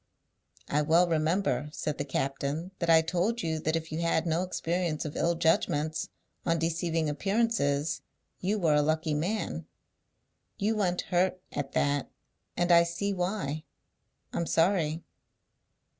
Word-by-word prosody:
"I 150 - +1
well 165 +4 +4
remember," 155 -4 +1
said 150 -1 -3
the 140 - -1
captain, 140 +5 -2
"that 170 - -1
I 160 -1 +7
told 180 +8 0
you 160 -1 -1
that 155 +1 0
if 160 -1 -3
you 155 - -2
had 165 -1 +1
no 165 +1 +1
experience 175 -3 -1
of 150 - -5
ill 170 0 +1
judgments 160 -1 +1 0.3
on 165 -1 +1
deceiving 165 0 0
appearances, 160 -3 0 0.4
you 200 +4 0
were 165 -6 +3
a 150 - +4
lucky 155 +1 0
man. 180 +9 -2 0.9
You 220 +2 +1
went 180 -4 +1
hurt 185 +1 +1
at 145 -2 -4
that, 145 -1 +1 0.5
and 175 0 +2
I 170 0 +8
see 170 +4 -1
why. 180 -5 -2 0.7
I'm 170 - -1
sorry." 165 -2 +2
165 Hz, 145 wpm, -29 LUFS, 155-180 Hz, 0.9 s, I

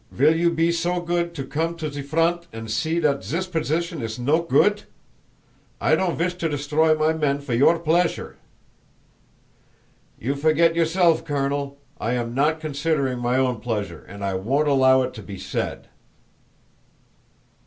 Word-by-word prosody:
"Vill 150 +5 +3
you 170 +1 +3
be 165 0 +1
so 170 +1 0
goot 170 0 -2
to 135 -4 -4
come 165 +4 -2
to 155 -3 -4
ze 145 0 -5
front 165 +4 0
and 115 -1 -7
see 160 +9 0
dat 145 -4 +1
zis 170 +5 -2
position 165 -2 -2
iss 110 -1 -4
no 145 +7 +2
goot? 170 +6 +2 0.9
I - - +2
don't 185 -3 -1
vish 180 +2 0
to 165 - 0
destroy 150 +2 +2
my 155 +1 +2
men 145 -3 0
for 140 -3 -5
your 140 +8 +4
pleasure!" 165 +2 0 1.8
"You 130 +5 -1
forget 160 +3 +3
yourself, 165 0 +2
Colonel. 140 -2 -2 0.2
I 115 - -1
am 120 -1 -2
not 150 +5 +1
considering 145 -4 -1
my 120 +1 0
own 130 -3 +1
pleasure 110 -3 -4
and 100 0 -7
I 100 - -1
won't 130 +11 0
allow 130 -2 +4
it 130 - -4
to 110 - -9
be 100 -1 -9
said!" - - -4
150 Hz, 160 wpm, -23 LUFS, 130-165 Hz, 1.8 s, your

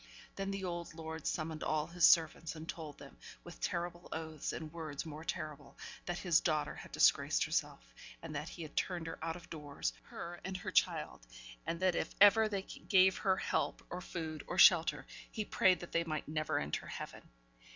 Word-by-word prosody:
Then 195 0 -3
the 195 0 -3
old 175 -2 -4
lord 160 -1 -5
summoned 155 -1 -2
all 155 -1 +1
his 170 +1 +5
servants, 165 0 +3
and 160 +1 -8
told 155 -4 -6
them, 140 - -13 0.2
with 175 - -11
terrible 175 0 -3
oaths, 160 -2 -4
and 155 -1 -6
words 155 -4 -5
more 155 0 -7
terrible, 150 -3 -5 0.3
that 175 - -1
his 175 -3 +3
daughter 155 -3 0
had - - -10
disgraced - - +4
herself, - - -2 0.3
and 165 -2 -6
that 150 +3 -3
he 170 - -7
had 155 - -10
turned 175 -3 -1
her 165 - -6
out 165 0 -2
of 175 - -11
doors 150 -3 -3
her, 175 0 -7
and 190 -1 -3
her 180 - -5
child - - +1 0.4
and 165 - -1
that 185 -1 +4
if - - -2
ever 215 +2 +7
they 200 -2 -2
gave 190 -1 +3
her 190 -2 +2
help, - - -1
or 180 - -4
food, 160 -4 -5
or 175 - -4
shelter, 175 -2 +6 0.3
he 215 -2 -3
prayed 185 -2 +3
that 175 - -8
they 170 - +2
might 155 -2 -3
never 155 0 -1
enter 75 +1 -2
heaven. - - -7
165 Hz, 195 wpm, -35 LUFS, 155-180 Hz, 0.4 s, ever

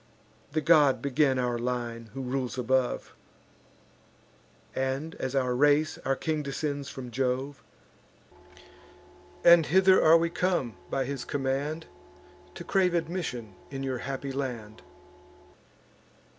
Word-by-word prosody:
The 155 - +1
god 145 -6 +5
began 135 +1 +2
our 125 -1 -1
line, 120 -2 -3
who 135 - -4
rules 130 0 -3
above; 125 0 0 1.6
And, 135 +4 -2
as 130 +1 -3
our 130 -2 +1
race, 145 +4 +3
our 135 - +1
king 155 +2 -2
descends 140 0 -3
from 125 -3 -8
Jove: 130 +3 -2 1.8
And 170 -2 +7
hither 190 +2 +5
are 160 +1 +7
we 165 0 0
come, 175 -10 0
by 135 -1 -1
his 135 -1 -4
command, 145 +3 -2 0.7
To - - -7
crave 185 -3 +2
admission 160 - -3 0.2
in 135 -1 -5
your 130 -2 -2
happy 135 +1 -4
land. 120 -6 -5
135 Hz, 115 wpm, -28 LUFS, 125-155 Hz, 1.8 s, And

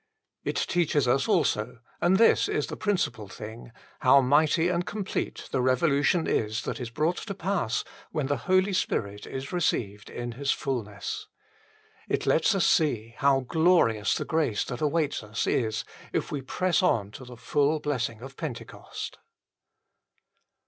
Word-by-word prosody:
It - - -2
teaches 155 -6 +1
us 135 +2 +2
also 105 +3 +1 0.2
and 185 +2 +4
this 230 - +5
is - - 0
the - - -6
principal 125 - -1
thing 110 +4 -9 0.3
how 130 +2 +6
mighty 150 +5 +3
and 175 -1 0
complete 200 +1 -4
the 130 - +1
revolution 140 +5 +2
is 110 0 0
that - - -4
is 120 -2 -4
brought 155 +8 0
to 200 -3 -5
pass 185 - -1 0.3
when 150 -4 -2
the 145 +1 0
Holy 185 +1 +4
Spirit 105 - -2
is 135 +3 -6
received 105 - -1
in 120 0 -5
His 135 +3 -1
fulness. 110 -7 -3 0.8
It - - 0
lets 165 +6 +3
us 190 - +2
see 145 - +2
how 140 -1 +4
glorious 160 -7 +3
the - - -2
grace 155 -10 0
that 125 -2 -6
awaits 155 -1 0
us 105 +1 -3
is 110 -3 0 0.3
if - - -2
we 145 - -2
press 185 +8 +1
on 105 - +1
to 130 - -10
the 125 -1 -11
full 145 +5 +1
blessing 120 -6 -2
of 135 +2 -9
Pentecost. 145 -7 -7
140 Hz, 155 wpm, -27 LUFS, 115-170 Hz, 0.8 s, how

